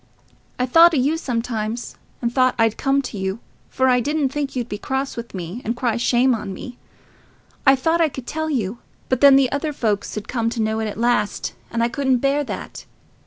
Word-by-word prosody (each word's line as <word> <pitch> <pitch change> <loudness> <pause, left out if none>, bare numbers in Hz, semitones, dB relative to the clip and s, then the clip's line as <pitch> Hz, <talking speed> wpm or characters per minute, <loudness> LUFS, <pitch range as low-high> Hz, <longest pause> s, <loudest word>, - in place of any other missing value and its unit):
I 250 - +1
thought 330 +6 +6
o' - - +2
you 275 +5 +2
sometimes, 235 -5 -3 0.3
and 235 0 0
thought 255 -1 +3
I'd 225 -1 +2
come 275 0 +1
to 220 -5 -6
you, 190 +3 -2 0.3
for 260 - +1
I 250 -1 +4
didn't 290 +2 0
think 280 0 -3
you'd 245 -2 -2
be 205 -3 -5
cross 270 +3 -2
with 235 -3 -7
me, 180 +6 -6
and 230 +3 -2
cry 240 -3 0
shame 245 +2 +3
on 210 -4 -4
me. 245 +5 -9 0.9
I 270 - +8
thought 325 +6 +1
I 320 - +4
could 265 -3 -8
tell 315 +3 -3
you. 235 -5 -2 0.3
But 260 -1 0
then 280 -1 +8
the 270 -2 +4
other 295 +2 -1
folks 215 -7 -2
'ud 210 - -5
come 230 -2 -1
to 235 0 -5
know 220 0 -1
it 220 - -1
at 210 - -6
last, 230 -3 0 0.2
and 230 0 -1
I - - +3
couldn't 265 +1 +1
bear 275 +3 +1
that. - - -7
250 Hz, 215 wpm, -21 LUFS, 225-275 Hz, 0.9 s, I